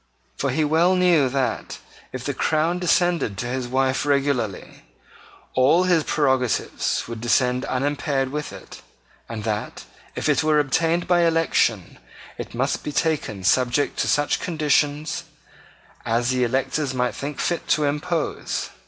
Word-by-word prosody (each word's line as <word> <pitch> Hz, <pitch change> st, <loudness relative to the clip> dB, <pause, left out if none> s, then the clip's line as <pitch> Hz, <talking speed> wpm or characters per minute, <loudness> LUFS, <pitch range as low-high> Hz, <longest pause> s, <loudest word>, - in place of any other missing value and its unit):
For 140 Hz, -, -1 dB
he 150 Hz, +5 st, +1 dB
well 165 Hz, +5 st, +3 dB
knew 175 Hz, -7 st, +4 dB
that, 135 Hz, 0 st, -2 dB, 0.3 s
if -, -, -6 dB
the -, -, -1 dB
crown 160 Hz, +3 st, 0 dB
descended 175 Hz, -, +1 dB
to 120 Hz, -, -3 dB
his 125 Hz, 0 st, -3 dB
wife 130 Hz, +1 st, +1 dB
regularly, 140 Hz, -8 st, -1 dB, 0.7 s
all 145 Hz, +8 st, +4 dB
its 175 Hz, -4 st, +1 dB
prerogatives 130 Hz, -5 st, 0 dB
would 115 Hz, -1 st, -7 dB
descend 125 Hz, +1 st, +1 dB
unimpaired 140 Hz, 0 st, -1 dB
with 150 Hz, +2 st, -4 dB
it, -, -, -11 dB, 0.5 s
and 110 Hz, -2 st, -5 dB
that, 105 Hz, -1 st, -3 dB, 0.3 s
if -, -, -2 dB
it -, -, +3 dB
were 155 Hz, -1 st, +3 dB
obtained 165 Hz, +4 st, +1 dB
by 175 Hz, -1 st, +3 dB
election, 160 Hz, -, +1 dB, 0.4 s
it -, -, -7 dB
must -, -, -1 dB
be 150 Hz, -, -4 dB
taken 145 Hz, -, -1 dB
subject 125 Hz, +7 st, +1 dB
to -, -, +1 dB
such 145 Hz, 0 st, +1 dB
conditions 150 Hz, -2 st, 0 dB, 0.8 s
as 120 Hz, +2 st, 0 dB
the 125 Hz, -1 st, +1 dB
electors 135 Hz, +3 st, -1 dB
might 125 Hz, -1 st, 0 dB
think 145 Hz, +1 st, -6 dB
fit 175 Hz, -, -1 dB
to 155 Hz, -, +2 dB
impose. 150 Hz, +3 st, -2 dB
145 Hz, 145 wpm, -23 LUFS, 125-160 Hz, 0.8 s, knew